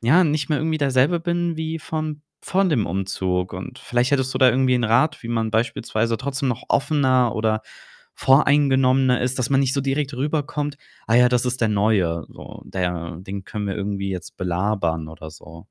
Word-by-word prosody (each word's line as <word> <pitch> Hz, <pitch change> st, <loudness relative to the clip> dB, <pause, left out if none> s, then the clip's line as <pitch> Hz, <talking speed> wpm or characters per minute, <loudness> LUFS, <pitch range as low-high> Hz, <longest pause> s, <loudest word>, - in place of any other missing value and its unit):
ja, 145 Hz, +11 st, +5 dB
nicht 150 Hz, -4 st, 0 dB
mehr 150 Hz, -, +1 dB
irgendwie 160 Hz, 0 st, -1 dB
derselbe 140 Hz, +4 st, +2 dB
bin 170 Hz, 0 st, -1 dB
wie 160 Hz, 0 st, -4 dB
vorm 155 Hz, -1 st, -4 dB, 0.2 s
vor 195 Hz, +1 st, +1 dB
dem 130 Hz, -, +1 dB
Umzug. 95 Hz, -1 st, -2 dB
Und 95 Hz, +8 st, -7 dB
vielleicht 125 Hz, +2 st, 0 dB
hättest 130 Hz, -1 st, +1 dB
du 130 Hz, -, -2 dB
da 130 Hz, -1 st, +6 dB
irgendwie 130 Hz, 0 st, +3 dB
'n 120 Hz, -, 0 dB
Rat, 130 Hz, +5 st, +2 dB
wie -, -, -6 dB
man 115 Hz, -1 st, -1 dB
beispielsweise 115 Hz, 0 st, 0 dB
trotzdem 135 Hz, 0 st, -2 dB
noch 125 Hz, 0 st, -2 dB
offener 130 Hz, -5 st, +2 dB
oder 110 Hz, 0 st, 0 dB, 0.6 s
voreingenommener 135 Hz, -2 st, +4 dB
ist, 125 Hz, +1 st, -1 dB
dass 125 Hz, -, 0 dB
man 135 Hz, -1 st, +4 dB
nicht 130 Hz, -2 st, +1 dB
so 140 Hz, -, +1 dB
direkt 135 Hz, +1 st, -1 dB
rüberkommt: 145 Hz, +1 st, -2 dB, 0.3 s
„Ah 115 Hz, -, +1 dB
ja, 125 Hz, +1 st, +6 dB
das 125 Hz, -1 st, +1 dB
ist 125 Hz, +1 st, -2 dB
der 115 Hz, -, +2 dB
Neue, 100 Hz, -6 st, +1 dB
so. -, -, -11 dB
Der 90 Hz, -2 st, -3 dB
den 95 Hz, +1 st, -7 dB
können 105 Hz, 0 st, -4 dB
wir 100 Hz, -, -3 dB
irgendwie 100 Hz, -1 st, -3 dB
jetzt 90 Hz, -2 st, -7 dB
belabern“, 90 Hz, -3 st, -1 dB
oder 80 Hz, 0 st, -10 dB
so. 80 Hz, +1 st, -13 dB
125 Hz, 190 wpm, -22 LUFS, 100-140 Hz, 0.6 s, da